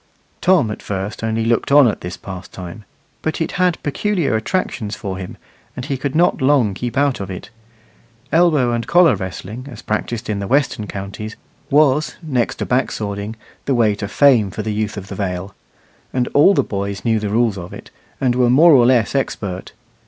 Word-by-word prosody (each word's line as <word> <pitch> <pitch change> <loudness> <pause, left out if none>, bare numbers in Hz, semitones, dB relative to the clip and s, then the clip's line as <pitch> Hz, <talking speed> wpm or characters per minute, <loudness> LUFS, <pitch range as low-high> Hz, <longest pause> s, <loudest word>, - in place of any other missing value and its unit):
Tom 175 -12 +3
at - - -6
first 100 +2 -4
only 110 0 0
looked 115 +3 +1
on 145 -2 +7
at 105 - -2
this 90 0 -6
pastime, 95 +1 -9 0.4
but 160 - -2
it 160 - -1
had 180 -2 +3
peculiar 170 - 0
attractions 110 - -2
for 95 -2 -5
him, 90 - -7 0.4
and - - -5
he 140 -1 -2
could 135 +2 -3
not 170 -2 +3
long 130 -6 +3
keep 120 +4 -4
out 140 -2 +2
of 100 -1 -5
it. 95 +2 -8 0.8
Elbow 160 -7 +3
and 115 -1 -2
collar 175 -1 +5
wrestling, 105 +6 -7
as 120 -5 -10
practised 110 +1 -3
in 105 -2 -2
the 100 - -4
western 130 -5 +1
counties, 100 +3 -6 0.3
was, 150 0 +3
next 130 -7 0
to - - -3
back 125 +1 +1
swording, 100 +1 -4 0.3
the 135 - +1
way 110 -3 +3
to 100 0 -5
fame 120 -3 +4
for 105 +3 -5
the 110 0 -2
youth 105 0 -2
of 100 -1 -7
the 100 - -7
Vale; 95 0 -4 0.6
and 125 -2 0
all 190 +8 +5
the - - +3
boys 100 0 -4
knew 110 -2 +2
the 105 -1 -3
rules 115 0 +2
of 85 - -8
it, - - -11 0.3
and 130 -2 +2
were 125 -1 +3
more 155 +7 +7
or 125 -5 +6
less 120 -5 +3
expert. 100 -9 -3
115 Hz, 195 wpm, -19 LUFS, 100-140 Hz, 0.8 s, on